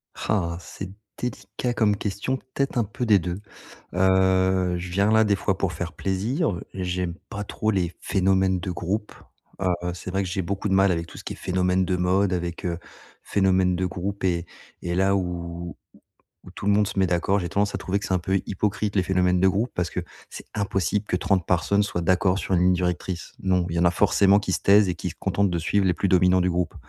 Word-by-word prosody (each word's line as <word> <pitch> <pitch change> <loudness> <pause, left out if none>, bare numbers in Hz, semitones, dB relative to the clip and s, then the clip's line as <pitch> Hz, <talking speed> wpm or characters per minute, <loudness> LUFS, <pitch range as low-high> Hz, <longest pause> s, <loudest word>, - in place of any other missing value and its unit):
Ah, 85 -5 -1
c'est 95 +2 -8 0.3
délicat 120 0 -3
comme 105 -3 +2
question, 105 +6 -2
peut-être 130 0 -3
un 115 - +3
peu 115 +4 -4
des 105 -3 +6
2. 90 +3 -4 0.5
Heu, 95 -1 +3
je 90 +1 -6
viens 100 +3 +2
là, 110 0 +5
des 100 -1 +3
fois, 95 0 -1
pour 95 -2 -1
faire 85 +1 -4
plaisir, 100 - -1
j'aime 90 -2 -2
pas 100 +1 -4
trop 110 +2 -1
les 90 -3 0
phénomènes 95 -1 +2
de 90 0 -4
groupe. 95 +5 -3 0.5
Heu, 90 -2 +1 0.2
c'est 90 +1 -7
vrai 95 +1 0
que 90 - -4
j'ai 95 +1 -1
beaucoup 100 +3 -3
de - - +1
mal 95 0 +4
avec 85 0 -2
tout - - -12
ce - - -9
qui - - -5
est - - -8
phénomène 90 0 +1
de 90 -1 0
mode, 95 +2 +2
avec, 85 +1 -3
heu, 85 -1 -1 0.4
phénomène 95 -2 +2
de 95 +1 -1
groupe 95 +2 -4
et 85 -2 +1 0.4
et 85 0 -2
là 95 +1 +3
où 85 -2 -3
où - - -9 0.7
où 90 - -11
tout 95 +2 -8
le - - +5
monde 105 0 +3
se - - -6
met 95 - +4
d'accord, 90 +3 +1
j'ai 90 0 -3
tendance 100 0 0
à - - -2
trouver 100 +1 -1
que 100 - -6
c'est 95 - -1
un - - +4
peu 95 +3 0
hypocrite 100 +1 -1
les 95 - +3
phénomènes 90 -1 +2
de 95 - +5
groupe 110 +6 -1
parce 90 -1 -1
que - - -3 0.3
c'est - - -9
impossible 100 0 -1
que 90 - 0
30 95 -2 +1
personnes 100 +4 +2
soient 95 -3 -3
d'accord 90 +2 +2
sur 95 - -2
une 90 - +3
ligne 90 0 +4
directrice. 90 0 -2
Non, 90 -2 +2
il 85 - -3
y - - +1
en - - +3
a 85 - +5
forcément 100 0 +4
qui 95 -2 -2
se - - -1
taisent 100 0 +6
et 90 - -1
qui - - -4
se - - -10
contentent 100 -1 +1
de 85 -1 -1
suivre 95 +4 +1
les 90 - +3
plus 100 - -1
dominants 90 0 +4
du 90 0 +2
groupe 90 -1 -1
95 Hz, 235 wpm, -24 LUFS, 90-100 Hz, 0.7 s, des